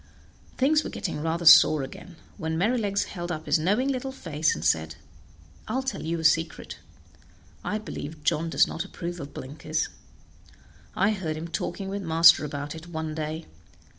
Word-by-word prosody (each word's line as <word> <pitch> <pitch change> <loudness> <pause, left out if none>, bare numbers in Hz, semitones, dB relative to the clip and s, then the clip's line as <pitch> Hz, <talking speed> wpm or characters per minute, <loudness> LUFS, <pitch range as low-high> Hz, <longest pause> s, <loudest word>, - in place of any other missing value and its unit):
Things 300 +4 +3
were - - -5
getting 150 - -4
rather 165 +2 -2
sore 155 -2 +8
again, 170 +6 -10 0.2
when 160 0 -2
Merrylegs 205 0 +1
held 175 -2 -6
up 155 -1 -5
his - - +2
knowing 205 - +1
little 265 -1 -2
face 160 - -1
and 75 - -6
said, 80 -1 +1 0.7
"I'll 260 +1 -1
tell 265 - -3
you 165 +1 -2
a - - -5
secret: 160 0 +1 0.8
I 210 - -1
believe 160 -7 -7
John 165 +3 +1
does - - +4
not 165 - -4
approve 175 0 -6
of 140 -1 -7
blinkers; 155 +4 -3 1.1
I 200 +3 +3
heard 170 -7 -3
him 165 +2 -5
talking 190 +3 -4
with 200 +1 -3
master 165 -2 +6
about 145 0 -4
it 165 +1 -10
one 160 -2 -4
day. 155 +1 -4
165 Hz, 165 wpm, -26 LUFS, 155-195 Hz, 1.1 s, sore